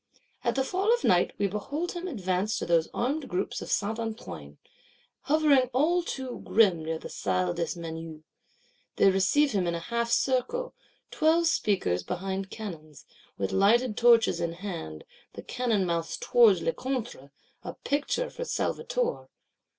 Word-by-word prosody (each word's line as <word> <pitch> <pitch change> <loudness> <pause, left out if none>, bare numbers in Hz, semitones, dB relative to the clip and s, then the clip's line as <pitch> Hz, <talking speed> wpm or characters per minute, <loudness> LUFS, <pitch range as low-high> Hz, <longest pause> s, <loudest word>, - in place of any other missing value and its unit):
At - - 0
the 265 - +2
fall 380 +10 0
of 480 0 +2
night, 180 -1 +4
we - - +1
behold 275 - -3
him 355 +1 -5
advance 195 - -1
to - - -3
those 165 -2 +2
armed 275 +4 -2
groups 185 +2 -2
of - - -7
Saint 215 +2 0
Antoine, 80 - -6 0.7
hovering 285 -4 +4
all 320 +7 +3
too 265 -6 -5
grim 190 -8 +3
near 160 +1 -2
the - - -8
Salle 90 -2 -1
des 170 +1 -3
Menus. 160 -1 -7 0.7
They 195 - +5
receive 275 +10 +3
him 190 -3 0
in 170 - 0
a - - -3
half 235 +6 -2
circle; 270 - 0 0.4
twelve 320 +2 +3
speakers 195 - +1
behind 190 - -4
cannons, 160 -9 -9 0.3
with 95 -1 -2
lighted 220 +4 +3
torches 230 -7 +4
in 170 -1 -1
hand, 170 - -6 0.3
the - - -9
cannon 230 -6 0
mouths 170 -1 -2
towards 215 -8 +4
Lecointre: 240 - -3 0.3
a - - -7
picture 300 - -1
for - - -5
Salvator! - - -2
210 Hz, 150 wpm, -28 LUFS, 170-270 Hz, 0.7 s, They